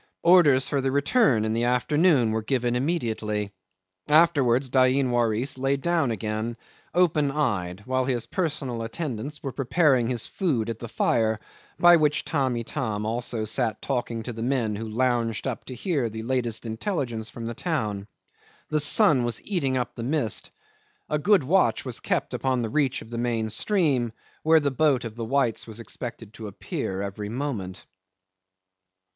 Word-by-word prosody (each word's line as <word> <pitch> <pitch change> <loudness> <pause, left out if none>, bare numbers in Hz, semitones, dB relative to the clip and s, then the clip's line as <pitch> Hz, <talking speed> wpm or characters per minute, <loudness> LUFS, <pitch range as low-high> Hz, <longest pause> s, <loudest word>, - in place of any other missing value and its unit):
Orders 160 -7 +5
for 140 -2 0
the 135 - 0
return 140 - +3
in 110 - -1
the 115 +1 0
afternoon 130 0 +3
were 110 0 -1
given 120 +1 0
immediately. 110 - -1 0.6
Afterwards 140 -5 +3
Dain 130 0 +3
Waris 120 +2 0
lay 135 +1 +1
down 165 -2 +1
again, 110 +1 -3 0.4
open 155 -5 +3
eyed, 100 -10 -2
while 130 0 0
his 125 -3 -1
personal 145 -9 -2
attendants 135 +3 -5
were 135 - -3
preparing 135 -2 +2
his 120 -3 -1
food 125 - -1
at 115 - -7
the 120 - -6
fire, 110 -1 +1 0.4
by 175 0 +7
which 150 -2 +1
Tamb' 135 -5 0
Itam 110 -3 -3
also 115 0 -2
sat 115 +1 0
talking 120 -4 -3
to 120 - -5
the 115 - -7
men 120 -4 0
who 110 +2 -5
lounged 120 -1 0
up 130 -4 -4
to 130 - -7
hear 135 -3 -1
the 110 +1 -6
latest 120 -2 -1
intelligence 115 - -3
from 115 - -8
the 115 - -3
town. 110 - -2 0.6
The 155 - +2
sun 150 - +5
was 120 -2 -1
eating 140 -10 0
up 125 - -2
the - - -7
mist. 125 -3 -1 0.6
A 150 - 0
good 195 +1 +4
watch 185 +8 +2
was - - -4
kept - - -1
upon 130 -2 0
the 110 - -2
reach 140 +1 0
of 110 - -16
the 115 - -3
main 115 -2 -1
stream 135 - +1 0.3
where 160 +1 +5
the 145 -2 0
boat 135 -2 +2
of 110 -2 -6
the 115 -1 -4
whites 125 -2 0
was 110 0 -7
expected 115 -2 -7
to 110 -1 -8
appear 95 -1 -4
every 100 +1 -5
moment. 115 -7 -4
125 Hz, 165 wpm, -25 LUFS, 115-145 Hz, 0.6 s, by